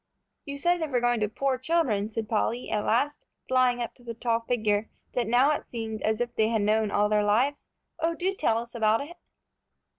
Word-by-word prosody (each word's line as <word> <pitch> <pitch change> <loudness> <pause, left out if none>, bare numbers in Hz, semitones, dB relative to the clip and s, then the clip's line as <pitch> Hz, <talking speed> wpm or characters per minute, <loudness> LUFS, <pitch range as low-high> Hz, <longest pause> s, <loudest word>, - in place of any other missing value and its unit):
"You 280 -1 -5
said 350 +3 +1
they 320 - 0
were 255 -4 +1
going 240 -1 +2
to 210 -1 0
poor 265 +3 -1
children," 255 -9 +1
said 220 0 -4
Polly, 230 +2 -1
at 210 -1 0
last, 280 +6 0 0.2
flying 250 -1 +2
up 235 - -6
to 245 - -19
the 230 -1 -6
tall 230 0 0
figure 220 -3 0 0.2
that 240 -3 0
now 250 +5 +4
it 300 - -3
seemed 220 -2 -5
as 220 0 0
if 240 0 -2
they 220 - +3
had 220 -2 +1
known 215 +1 +2
all 205 +1 +2
their 210 0 +2
lives. 245 +8 +1 0.3
"Oh, 335 +1 0
do 370 +3 -1
tell 230 -12 +1
us 235 0 -6
about 225 +1 +2
it." 345 +2 -13
235 Hz, 215 wpm, -27 LUFS, 220-270 Hz, 0.3 s, now